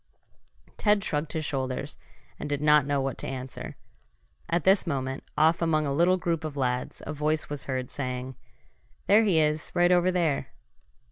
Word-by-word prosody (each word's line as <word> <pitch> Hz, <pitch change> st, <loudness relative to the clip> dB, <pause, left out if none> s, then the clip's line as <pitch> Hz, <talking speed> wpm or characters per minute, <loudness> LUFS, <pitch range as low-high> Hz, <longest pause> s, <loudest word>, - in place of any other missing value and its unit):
Ted 210 Hz, -1 st, +3 dB
shrugged 150 Hz, -5 st, -2 dB
his 160 Hz, -2 st, -2 dB
shoulders, 135 Hz, +1 st, -3 dB, 0.4 s
and 145 Hz, -, -5 dB
did 145 Hz, -1 st, -1 dB
not 150 Hz, -1 st, +4 dB
know 145 Hz, -1 st, +1 dB
what 135 Hz, -2 st, -3 dB
to -, -, -2 dB
answer. 130 Hz, 0 st, -6 dB, 0.7 s
At 170 Hz, -1 st, +1 dB
this 190 Hz, -1 st, +4 dB
moment, 135 Hz, -3 st, -3 dB
off 160 Hz, +2 st, +4 dB
among 155 Hz, -2 st, +2 dB
a 140 Hz, -, -1 dB
little 175 Hz, +5 st, +3 dB
group 170 Hz, -2 st, -2 dB
of 150 Hz, -2 st, -5 dB
lads, 125 Hz, -2 st, -2 dB
a 155 Hz, -, -4 dB
voice 155 Hz, +1 st, -1 dB
was 145 Hz, -, -4 dB
heard 130 Hz, -2 st, -3 dB
saying: 130 Hz, -1 st, -4 dB, 0.7 s
"There 215 Hz, +3 st, +5 dB
he 190 Hz, -7 st, +3 dB
is 150 Hz, 0 st, +1 dB
right 175 Hz, 0 st, +4 dB
over 180 Hz, 0 st, +4 dB
there!" 170 Hz, -6 st, 0 dB
150 Hz, 175 wpm, -27 LUFS, 135-170 Hz, 0.7 s, There